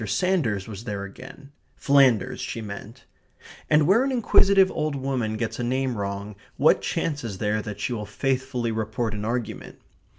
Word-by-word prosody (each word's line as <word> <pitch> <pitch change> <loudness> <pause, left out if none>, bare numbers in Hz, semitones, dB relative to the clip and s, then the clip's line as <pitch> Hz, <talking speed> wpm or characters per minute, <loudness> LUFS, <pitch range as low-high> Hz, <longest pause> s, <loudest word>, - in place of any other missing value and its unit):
Sanders 130 - 0
was 110 +1 -8
there 100 -3 -4
again; 130 +7 -11 0.2
Flanders 135 -7 +3
she - - -4
meant; 110 +3 -8 0.6
and 150 0 +5
where 205 - +4
an 270 - 0
inquisitive 195 -5 +4
old 155 -2 -2
woman 130 -5 -2
gets 115 +1 -3
a - - -1
name 130 +1 0
wrong, 100 0 -4 0.2
what - - +4
chance 150 -4 -2
is 105 -5 -5
there 105 +2 0
that 105 -1 -7
she 125 - -2
will 105 -3 -4
faithfully 130 -3 -1
report 110 +1 -2
an 105 0 -4
argument? 120 +1 -4
120 Hz, 165 wpm, -25 LUFS, 105-140 Hz, 0.6 s, and